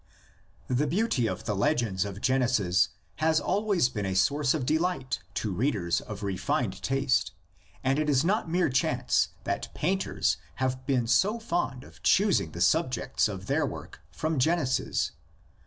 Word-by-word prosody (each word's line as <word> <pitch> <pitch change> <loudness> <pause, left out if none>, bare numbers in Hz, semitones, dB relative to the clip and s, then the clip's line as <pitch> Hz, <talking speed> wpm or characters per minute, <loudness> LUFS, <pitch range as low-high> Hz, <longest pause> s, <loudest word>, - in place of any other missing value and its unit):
THE 130 +4 +1
beauty 170 - +1
of - - -4
the 105 - -2
legends 105 - +1
of 100 0 -7
Genesis 125 -8 +2 0.3
has 160 0 +3
always 200 -5 +1
been 105 -6 -3
a 95 - -2
source 140 +8 +2
of 140 -5 -2
delight 160 -3 0 0.2
to 105 -3 -2
readers 100 -6 0
of 105 -1 -8
refined 95 -2 -1
taste 135 -8 +1 0.5
and 135 +2 +2
it 155 -1 0
is 140 +1 +3
not 200 -1 +1
mere 175 -1 +2
chance 130 - +2 0.2
that - - -3
painters 190 +5 0 0.2
have 130 -1 -2
been 130 -4 +2
so 190 - +3
fond 170 - -2
of - - -16
choosing 195 - +3
the 85 - -5
subjects 130 - +2
of - - -6
their - - +1
works - - -8
from 155 -2 -2
Genesis. 150 -2 +1
130 Hz, 155 wpm, -28 LUFS, 110-160 Hz, 0.5 s, has